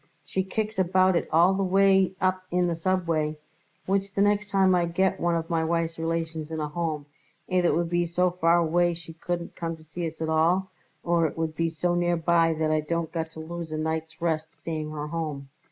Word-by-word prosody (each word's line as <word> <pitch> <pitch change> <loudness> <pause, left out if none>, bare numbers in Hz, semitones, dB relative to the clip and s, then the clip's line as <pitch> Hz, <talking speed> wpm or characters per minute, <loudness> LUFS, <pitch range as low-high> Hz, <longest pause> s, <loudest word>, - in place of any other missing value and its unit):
She 190 - -1
kicks 215 +2 -3
about 185 0 +3
it - - 0
all 175 +4 +5
the 195 - -1
way 195 0 +4
up 185 0 +1
in 180 0 +2
the 170 -1 0
subway, 165 -3 0 0.5
which 195 +1 -1
the 195 - +2
next 205 0 +1
time 190 -2 +4
I 175 -1 +2
get 190 +3 +1
one 170 0 +1
of 165 0 -2
my 165 -2 0
wife's 165 0 -1
relations 165 -1 -2
in 160 -1 -4
a 150 - -1
Home, 155 -2 -3 0.4
either 180 -1 +2
it - - +2
would 170 0 -1
be 175 0 +1
so 180 +2 +1
far 170 -1 +3
away 175 +1 +2
she 165 -1 -10
couldn't 170 +1 -4
come 165 -1 -4
to 160 - -17
see 165 +2 -4
us 160 - -9
at 160 - -2
all, 170 +4 +2 0.3
or 170 -1 +2
it 150 - -8
would 160 -1 -1
be 165 +1 0
so 175 +2 -1
nearby 170 -1 +2
that 155 0 0
I 155 - +3
don't 170 +1 -2
got 160 -1 -3
to - - -9
lose 170 0 -6
a 155 - -2
night's 160 +1 -3
rest 160 -2 -2
seeing 155 -2 -4
her 150 -1 -4
home. 150 -4 -4
170 Hz, 220 wpm, -26 LUFS, 160-180 Hz, 0.5 s, all